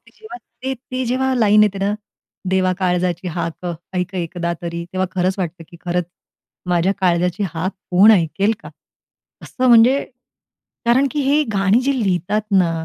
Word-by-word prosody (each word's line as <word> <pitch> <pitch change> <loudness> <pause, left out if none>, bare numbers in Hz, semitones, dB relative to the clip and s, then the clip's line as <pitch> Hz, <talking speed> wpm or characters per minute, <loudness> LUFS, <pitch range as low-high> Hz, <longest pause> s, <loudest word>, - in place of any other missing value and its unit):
जेव्हा 435 -5 -11 0.3
ते, 265 0 -2
ते 255 +1 -5
जेव्हा 260 +2 0
लाईन 215 -3 +5
येते 200 -2 +1
ना, 200 +1 0 0.6
देवा 185 -1 +2
काळजाची 180 -1 0
हाक 170 +1 -4 0.3
ऐक 180 +1 -2
एकदा 170 -1 -3
तरी. 170 0 -4
तेव्हा 185 0 0
खरंच 185 0 0
वाटतं, 175 -2 -4
की 170 - -14
खरंच 175 0 0 0.6
माझ्या 180 +2 +2
काळजाची 180 +1 +1
हाक 185 +4 -2 0.2
कोण 195 +5 +7
ऐकेल 195 +3 +2
का? - - -9 0.7
असं 255 0 -2
म्हणजे, 240 +4 +5 0.8
कारण 245 +4 +3
की 295 - -2
हे 290 +3 +3
गाणी 200 +4 +3
जी 275 +2 +1
लिहितात 195 +2 0 0.2
ना, 175 -3 +3
190 Hz, 155 wpm, -19 LUFS, 180-235 Hz, 0.8 s, कोण